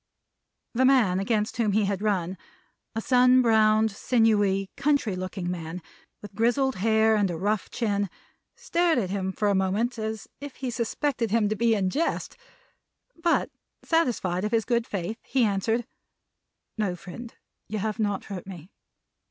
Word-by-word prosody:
The 250 Hz, +2 st, +2 dB
man 245 Hz, -9 st, +4 dB
against 210 Hz, +2 st, -1 dB
whom 215 Hz, -4 st, +1 dB
he 210 Hz, 0 st, +3 dB
had 195 Hz, -1 st, -2 dB
run, 190 Hz, -4 st, 0 dB, 0.6 s
a 225 Hz, -, -1 dB
sun 250 Hz, +1 st, +5 dB
browned, 220 Hz, -1 st, +4 dB
sinewy, 205 Hz, -4 st, +2 dB
country 280 Hz, -9 st, +1 dB
looking 185 Hz, -1 st, -4 dB
man, 170 Hz, 0 st, -5 dB, 0.4 s
with 205 Hz, -, -10 dB
grizzled 245 Hz, +4 st, +1 dB
hair 220 Hz, +2 st, +3 dB
and 205 Hz, -3 st, +2 dB
a 170 Hz, -, -3 dB
rough 205 Hz, +3 st, -1 dB
chin, 205 Hz, -4 st, -1 dB, 0.5 s
stared 350 Hz, -, +1 dB
at 190 Hz, -6 st, -1 dB
him 190 Hz, -1 st, -2 dB
for 210 Hz, +2 st, -1 dB
a 200 Hz, -, +3 dB
moment, 205 Hz, +6 st, 0 dB
as 220 Hz, -1 st, -4 dB
if 285 Hz, -1 st, -8 dB
he 255 Hz, -2 st, -4 dB
suspected 240 Hz, +1 st, -1 dB
him 215 Hz, -1 st, +2 dB
to 215 Hz, -, 0 dB
be 230 Hz, +1 st, +2 dB
in 190 Hz, -3 st, 0 dB
jest. 325 Hz, -, -1 dB, 0.8 s
But, 335 Hz, 0 st, +1 dB, 0.3 s
satisfied 235 Hz, -, 0 dB
of 210 Hz, -, -1 dB
his 225 Hz, -2 st, +1 dB
good 235 Hz, -1 st, 0 dB
faith, 200 Hz, +3 st, -4 dB
he 260 Hz, -2 st, +1 dB
answered: 220 Hz, +3 st, 0 dB, 0.9 s
"No, 195 Hz, -4 st, 0 dB
friend. 225 Hz, +7 st, -10 dB, 0.3 s
You 215 Hz, -, -3 dB
have 215 Hz, +2 st, -3 dB
not 205 Hz, -2 st, -1 dB
hurt 190 Hz, -3 st, -7 dB
me." 180 Hz, -1 st, -10 dB
215 Hz, 160 wpm, -26 LUFS, 195-240 Hz, 0.9 s, sun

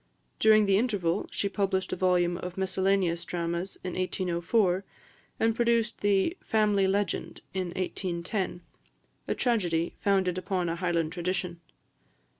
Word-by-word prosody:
During 215 Hz, -1 st, +6 dB
the 195 Hz, 0 st, +4 dB
interval, 200 Hz, -7 st, 0 dB
she 200 Hz, -, -1 dB
published 195 Hz, -1 st, -1 dB
a -, -, 0 dB
volume 175 Hz, -1 st, +2 dB
of 180 Hz, 0 st, -6 dB
miscellaneous 190 Hz, -2 st, +1 dB
dramas 170 Hz, +2 st, -3 dB
in 180 Hz, -1 st, -4 dB
1804, 185 Hz, +1 st, +1 dB, 0.6 s
and 225 Hz, 0 st, +2 dB
produced 235 Hz, -1 st, +1 dB
the 205 Hz, -, +2 dB
"Family 210 Hz, -3 st, +2 dB
Legend" 200 Hz, +1 st, -1 dB
in 185 Hz, -1 st, -1 dB
1810, 185 Hz, 0 st, -2 dB, 0.7 s
a -, -, 0 dB
tragedy, 175 Hz, -9 st, 0 dB
founded 190 Hz, -3 st, +1 dB
upon 185 Hz, -2 st, -1 dB
a 165 Hz, -, -2 dB
Highland 170 Hz, -3 st, 0 dB
tradition. 180 Hz, 0 st, -3 dB
185 Hz, 125 wpm, -28 LUFS, 175-200 Hz, 0.7 s, During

